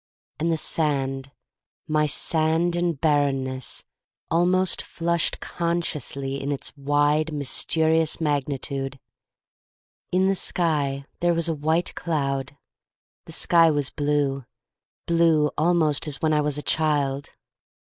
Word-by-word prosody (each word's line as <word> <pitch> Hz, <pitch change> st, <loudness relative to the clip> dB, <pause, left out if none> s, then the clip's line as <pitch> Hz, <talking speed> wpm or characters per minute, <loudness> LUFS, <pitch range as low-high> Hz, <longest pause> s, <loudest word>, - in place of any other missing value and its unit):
And 165 Hz, +2 st, 0 dB
the 165 Hz, -, +1 dB
sand 135 Hz, -4 st, -1 dB, 0.3 s
— -, -, -63 dB
my 150 Hz, 0 st, +3 dB
sand 160 Hz, +3 st, +1 dB
and 175 Hz, -4 st, -1 dB
barrenness 135 Hz, -4 st, 0 dB, 0.2 s
— -, -, -53 dB
almost 180 Hz, +2 st, +2 dB
flushed 170 Hz, -1 st, -1 dB
consciously 150 Hz, -5 st, -3 dB
in 140 Hz, +1 st, -3 dB
its 140 Hz, -, -4 dB
wide, 145 Hz, +2 st, +1 dB
mysterious 160 Hz, +3 st, +2 dB
magnitude. 140 Hz, -2 st, -2 dB, 1.1 s
In 185 Hz, +1 st, +3 dB
the 195 Hz, -, +3 dB
sky 145 Hz, -7 st, 0 dB
there 175 Hz, 0 st, +2 dB
was 170 Hz, 0 st, +1 dB
a 165 Hz, -, 0 dB
white 160 Hz, +3 st, 0 dB
cloud. 140 Hz, -4 st, -2 dB, 0.7 s
The -, -, -11 dB
sky 165 Hz, -1 st, +4 dB
was 145 Hz, -3 st, 0 dB
blue 145 Hz, -2 st, -1 dB, 0.3 s
— -, -, -71 dB
blue 165 Hz, -3 st, +3 dB
almost 160 Hz, -2 st, +2 dB
as 145 Hz, -2 st, -1 dB
when 155 Hz, -1 st, +1 dB
I 150 Hz, -, +3 dB
was 150 Hz, -1 st, 0 dB
a 150 Hz, -, -4 dB
child. 145 Hz, -3 st, 0 dB
150 Hz, 130 wpm, -24 LUFS, 140-165 Hz, 1.1 s, sky